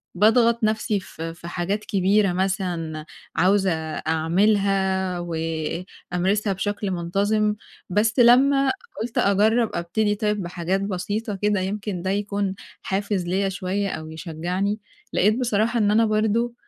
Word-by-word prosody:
باضغط 230 Hz, +3 st, +4 dB
نَفْسي 215 Hz, -1 st, +1 dB
ف 165 Hz, -, -12 dB
في 165 Hz, +1 st, -6 dB
حاجات 185 Hz, +5 st, -2 dB
كبيرة 195 Hz, 0 st, +2 dB
مثلًا 175 Hz, -5 st, -2 dB, 0.3 s
عاوزة 190 Hz, 0 st, +3 dB, 0.2 s
أعملها 190 Hz, +2 st, +1 dB
وأمارسها 175 Hz, +4 st, -2 dB
بشكل 205 Hz, +1 st, -2 dB
منتظم، 205 Hz, +5 st, 0 dB, 0.3 s
بس 215 Hz, +5 st, +1 dB
لمّا 270 Hz, +3 st, +5 dB, 0.3 s
قُلت 230 Hz, 0 st, -4 dB
أجرّب 215 Hz, +3 st, +3 dB
أبتدي 205 Hz, +5 st, 0 dB
طيّب 210 Hz, -1 st, -1 dB
بحاجات 180 Hz, +2 st, -2 dB
بسيطة 205 Hz, +3 st, -3 dB
كده 205 Hz, 0 st, +1 dB
يمكن 195 Hz, -1 st, -3 dB
ده 190 Hz, -, -2 dB
يكون 200 Hz, -1 st, -1 dB, 0.3 s
حافز 195 Hz, -1 st, -1 dB
ليَّ 195 Hz, +2 st, +1 dB
شويّة 190 Hz, +2 st, -2 dB
أو 155 Hz, -2 st, -6 dB
يشجّعني، 180 Hz, +6 st, -3 dB, 0.3 s
لقيت 215 Hz, +5 st, +3 dB
بصراحة 230 Hz, 0 st, +1 dB
إن 205 Hz, -1 st, +3 dB
أنا 225 Hz, +1 st, +4 dB
برضه، 220 Hz, +2 st, +1 dB
200 Hz, 120 wpm, -23 LUFS, 180-215 Hz, 0.3 s, لمّا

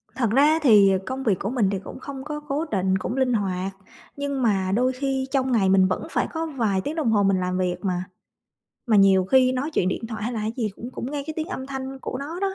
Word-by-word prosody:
Thật 235 Hz, -5 st, +1 dB
ra 295 Hz, +5 st, +4 dB
thì 210 Hz, -9 st, +6 dB
công 265 Hz, +1 st, -4 dB
việc 200 Hz, -7 st, +1 dB
của 200 Hz, -, -2 dB
mình 235 Hz, -6 st, +1 dB
thì 195 Hz, -, -2 dB
cũng 230 Hz, -, -10 dB
không 270 Hz, 0 st, -7 dB
có 300 Hz, 0 st, -5 dB
cố 295 Hz, +2 st, -3 dB
định, 190 Hz, -1 st, +1 dB
cũng 220 Hz, +7 st, -4 dB
linh 260 Hz, -2 st, +2 dB
hoạt 195 Hz, -3 st, -1 dB, 0.5 s
nhưng 280 Hz, -2 st, -2 dB
mà 195 Hz, -5 st, +1 dB
đôi 255 Hz, +3 st, +2 dB
khi 265 Hz, 0 st, -2 dB
trong 265 Hz, -2 st, +1 dB
ngày 200 Hz, -5 st, +3 dB
mình 190 Hz, -1 st, +5 dB
vẫn 185 Hz, -, -3 dB
phải -, -, 0 dB
có 325 Hz, 0 st, -2 dB
vài 225 Hz, -11 st, -1 dB
tiếng 295 Hz, +8 st, -4 dB
đồng 295 Hz, -8 st, +1 dB
hồ 205 Hz, -2 st, +3 dB
mình 195 Hz, -1 st, +2 dB
làm 180 Hz, 0 st, -1 dB
việc 180 Hz, -1 st, 0 dB
mà. 180 Hz, -1 st, -1 dB, 0.8 s
Mà 220 Hz, -3 st, +4 dB
nhiều 195 Hz, -1 st, +5 dB
khi 255 Hz, +4 st, +4 dB
nói 270 Hz, +5 st, -2 dB
chuyện 185 Hz, -, +1 dB
điện 225 Hz, -, -3 dB
thoại 220 Hz, -2 st, -6 dB
hay 240 Hz, +3 st, -2 dB
là 220 Hz, -, -3 dB
cái 215 Hz, +1 st, -2 dB
gì 225 Hz, -4 st, 0 dB
cũng 240 Hz, +2 st, -7 dB
cũng 255 Hz, +1 st, -5 dB
nghe 290 Hz, -1 st, -3 dB
cái 315 Hz, -, -5 dB
tiếng 320 Hz, +2 st, -3 dB
âm 265 Hz, -8 st, -5 dB
thanh 265 Hz, 0 st, -6 dB
của 255 Hz, -, -5 dB
nó 320 Hz, +6 st, -6 dB
đó, 390 Hz, -1 st, -1 dB
245 Hz, 265 wpm, -24 LUFS, 195-275 Hz, 0.8 s, thì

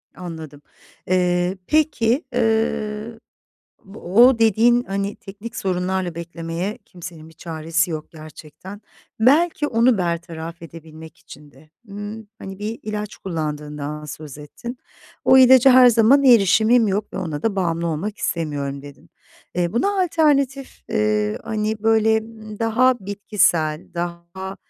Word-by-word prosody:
Anladım. 160 Hz, -5 st, -9 dB, 0.5 s
Eee, 180 Hz, 0 st, +1 dB
peki, 290 Hz, -3 st, +1 dB
ııı, 225 Hz, -1 st, -1 dB, 0.7 s
bu 200 Hz, +3 st, -13 dB, 0.3 s
o 260 Hz, -3 st, +1 dB
dediğin, 230 Hz, +2 st, +4 dB
hani, 200 Hz, 0 st, -3 dB
teknik 205 Hz, +4 st, -10 dB
sorunlarla 185 Hz, -1 st, -2 dB
beklemeye 170 Hz, +3 st, -5 dB
kimsenin 170 Hz, -3 st, -11 dB
bir 160 Hz, -, -18 dB
çaresi 165 Hz, +2 st, -2 dB
yok 155 Hz, -1 st, -6 dB
gerçekten. 155 Hz, +5 st, -12 dB, 0.4 s
Belki 295 Hz, +6 st, +3 dB
onu 235 Hz, -3 st, +2 dB
bertaraf 170 Hz, -1 st, -4 dB
edebilmek 160 Hz, -1 st, -12 dB
için 145 Hz, +1 st, -15 dB
de, 150 Hz, +3 st, -21 dB, 0.2 s
ımm, 205 Hz, +2 st, -8 dB
hani, 195 Hz, 0 st, -9 dB
bir 215 Hz, +2 st, -5 dB
ilaç 210 Hz, 0 st, -5 dB
kullandığından 150 Hz, -3 st, -5 dB
söz 150 Hz, -1 st, -9 dB
ettin. 235 Hz, -, -9 dB, 0.5 s
"O 265 Hz, -, +6 dB
ilaca 260 Hz, 0 st, +7 dB
her 255 Hz, 0 st, +8 dB
zaman 240 Hz, +5 st, +4 dB
erişimim 225 Hz, 0 st, +5 dB
yok 200 Hz, +2 st, -2 dB
ve -, -, -5 dB
ona 155 Hz, -5 st, -4 dB
da 220 Hz, -3 st, -1 dB
bağımlı 170 Hz, -2 st, -1 dB
olmak 170 Hz, +7 st, -3 dB
istemiyorum." 140 Hz, -4 st, -3 dB
dedin. 145 Hz, -1 st, -14 dB, 0.4 s
Eee, 175 Hz, -1 st, -1 dB
buna 390 Hz, -, 0 dB
alternatif, 280 Hz, -6 st, 0 dB
eee, 105 Hz, 0 st, 0 dB
hani, 215 Hz, 0 st, -2 dB
böyle, 220 Hz, 0 st, +3 dB
ımm, 220 Hz, -1 st, -10 dB
daha 235 Hz, +3 st, +3 dB
bitkisel, 185 Hz, -6 st, 0 dB
daha, 175 Hz, +2 st, -6 dB
195 Hz, 125 wpm, -21 LUFS, 165-225 Hz, 0.7 s, her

